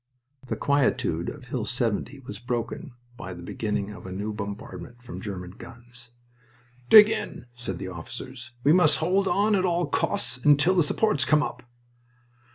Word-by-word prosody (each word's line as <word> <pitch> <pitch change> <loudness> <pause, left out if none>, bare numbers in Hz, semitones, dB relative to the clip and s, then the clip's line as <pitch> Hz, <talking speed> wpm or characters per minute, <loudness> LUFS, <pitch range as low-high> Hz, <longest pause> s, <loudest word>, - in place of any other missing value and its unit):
The - - -2
quietude 125 - +1
of 140 -4 -10
Hill 125 -2 -3
70 125 +3 -2
was 105 -5 -8
broken 120 +2 -4 0.2
by 95 -4 -7
the 85 - -10
beginning 105 +1 -3
of 105 -2 -10
a - - -7
new 105 +3 -4
bombardment 105 +4 -7
from 95 -5 -8
German 90 -4 -6
guns. 120 +2 -11 0.8
"Dig 210 -1 +10
in," 220 - -4
said 120 -7 -4
the 95 0 -5
officers. 120 +8 -8
"We 150 - +5
must 170 -4 +5
hold 190 +4 +1
on 210 +3 +2
at 185 - +1
all 175 -1 +1
costs 130 -12 0
until 145 +6 +4
the 180 - +4
supports 155 0 +2
come 150 +3 +3
up." - - -5
125 Hz, 165 wpm, -26 LUFS, 105-150 Hz, 0.8 s, Dig